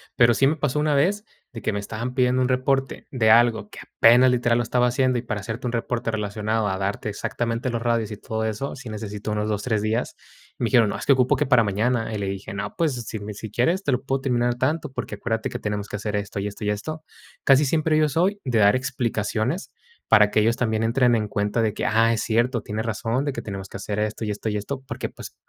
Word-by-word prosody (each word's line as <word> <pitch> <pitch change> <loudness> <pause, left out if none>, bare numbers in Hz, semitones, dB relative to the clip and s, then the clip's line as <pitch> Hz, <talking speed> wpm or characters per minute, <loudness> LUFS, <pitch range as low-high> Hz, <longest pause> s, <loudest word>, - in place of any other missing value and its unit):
Pero 120 -1 +5
sí 135 +4 +3
me 150 - +2
pasó 150 -1 -1
una 150 -1 +2
vez 195 +9 +1 0.3
de 115 - -7
que - - 0
me 100 - -1
estaban 115 +4 -5
pidiendo 125 0 +2
un 125 - +1
reporte 135 +1 0
de 110 -5 +3
algo 115 -2 +4
que - - -11
apenas 120 +3 +5
literal 120 -1 +2
lo 120 - +1
estaba 125 +2 +2
haciendo, 130 0 +1
y - - -4
para 115 -3 -4
hacerte 115 +4 -5
un - - -2
reporte 115 0 -2
relacionado 105 +1 -1
a 95 -1 -1
darte 100 +2 -3
exactamente 115 +4 -2
los 115 -1 -2
radios 115 -2 0
y 105 - -6
todo 110 +1 -4
eso, 110 +5 -3
sí 130 -3 -9
necesito 105 0 -5
unos 105 0 -1
2, 105 -1 -2
3 110 -4 0
días. 110 +3 -1 0.4
Me 120 - -1
dijeron: 115 -3 +4
"No, - - -3
es - - -6
que 140 - +6
ocupo 130 -1 +3
que - - +1
para 125 -3 +5
mañana". 110 +3 0
Y - - -2
le 100 - -3
dije: 95 0 -5
"No, 100 - -5
pues 165 -5 +1
si 110 - -5
me 105 +1 -6
si 105 +1 -7
quieres 165 - +1
te 145 - 0
lo 125 - -1
puedo 135 -1 -1
terminar 120 -2 +1
tanto, 150 +4 -1
porque 120 - -5
acuérdate 110 +1 -2
que - - -5
tenemos 105 -1 -3
que - - -5
hacer 105 0 -3
esto, 100 0 -4
y 100 - -2
esto, 105 +1 -8
y - - +1
esto". 155 +10 -5 0.4
Casi 135 +1 +6
siempre 155 +2 +2
yo 155 0 +4
soy 185 +8 +1
de 120 -4 +1
dar 100 +1 +5
explicaciones, 120 - -2 0.4
para 105 -2 +6
que - - +3
ellos 115 +2 +2
también 110 -2 0
entren 120 +1 +3
en 110 -2 -1
cuenta 105 +3 0
de 110 -2 +1
que: - - -3
"Ah, 115 +1 +3
es 110 - -1
cierto, 120 +1 +1
tienes 110 +1 -4
razón 115 +4 -1
de 145 - 0
que - - -5
tenemos 95 -2 -6
que - - -7
hacer 105 +1 -4
esto, 110 +1 -2
y 105 - -2
esto, 105 +2 -5
y 105 - -2
esto". 130 +6 -5
Porque, - - -4
pues, - - -11
115 Hz, 255 wpm, -24 LUFS, 105-130 Hz, 0.4 s, que